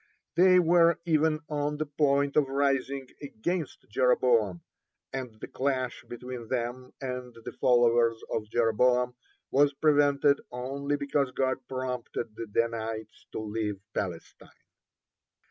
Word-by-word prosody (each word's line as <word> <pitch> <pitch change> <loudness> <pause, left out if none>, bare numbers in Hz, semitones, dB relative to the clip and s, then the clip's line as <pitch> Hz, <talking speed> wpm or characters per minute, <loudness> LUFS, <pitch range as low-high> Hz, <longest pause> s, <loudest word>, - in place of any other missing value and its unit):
They 185 +2 +6
were 170 -1 +5
even 155 -1 +2
on 150 0 -2
the 155 - -1
point 140 -1 +1
of 150 -3 +4
rising 135 -1 0
against 150 +4 -4
Jeroboam, 115 -6 +2 0.5
and 125 -5 -5
the - - -7
clash 130 -1 -2
between 120 -1 -7
them 125 +1 -3
and 125 -2 -5
the - - -4
followers 120 -2 +3
of 105 -1 -2
Jeroboam 125 +2 +2 0.4
was 145 +1 +4
prevented 145 -1 +3
only 135 +3 -2
because 140 -1 0
God 130 0 0
prompted 125 -3 -4
the 115 - -6
Danites 110 0 -3
to - - -3
leave 105 -2 -3
Palestine. 90 -4 -5
130 Hz, 120 wpm, -28 LUFS, 115-145 Hz, 0.5 s, They